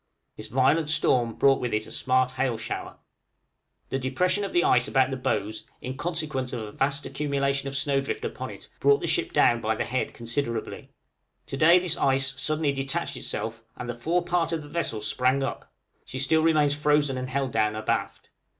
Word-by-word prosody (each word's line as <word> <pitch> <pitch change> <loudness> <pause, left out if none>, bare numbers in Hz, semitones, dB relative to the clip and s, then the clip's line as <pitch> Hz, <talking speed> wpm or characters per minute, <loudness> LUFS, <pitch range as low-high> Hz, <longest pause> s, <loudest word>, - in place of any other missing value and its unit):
This - - -6
violent 135 +5 +2
storm 125 -6 +3
brought 135 -1 +4
with 120 -3 -1
it 110 0 -1
a - - -11
smart 130 0 +1
hail 130 -3 -1
shower. 110 0 -5
{DISCO - - -32
SIGHTED.} - - -47
The 135 - 0
depression 180 +10 0
of 195 - -3
the 175 - +3
ice 125 +1 +4
about 130 -1 +2
the - - -1
bows, 110 -4 -2
in 130 +1 -6
consequence 150 -5 -2
of 120 - -3
a 105 - -7
vast 140 +5 -1
accumulation 140 -1 -1
of 135 - -6
snow 135 +1 +1
drift 430 - -4
upon - - -5
it, - - -10
brought 425 0 +4
the - - -2
ship 355 0 +1
down 120 0 +3
by 110 +1 0
the - - -2
head 130 +2 -2
considerably; 115 -1 -4 0.6
to - - -5
day 160 +5 +6
this 180 -2 +1
ice 135 0 +1
suddenly 155 +1 +1
detached 135 +5 -2
itself, 115 +2 -3
and 120 - -6
the 120 - -3
fore 165 +9 -1
part 175 -1 0
of 165 -2 -2
the - - -11
vessel 145 -8 -2
sprang 130 +5 +1
up; - - -5 0.3
she 130 - -7
still 135 +4 +3
remains 155 -3 +3
frozen 150 -1 +2
and 130 0 -4
held 135 0 -1
down 110 -1 +1
abaft. 110 0 -3
135 Hz, 205 wpm, -26 LUFS, 125-155 Hz, 0.6 s, day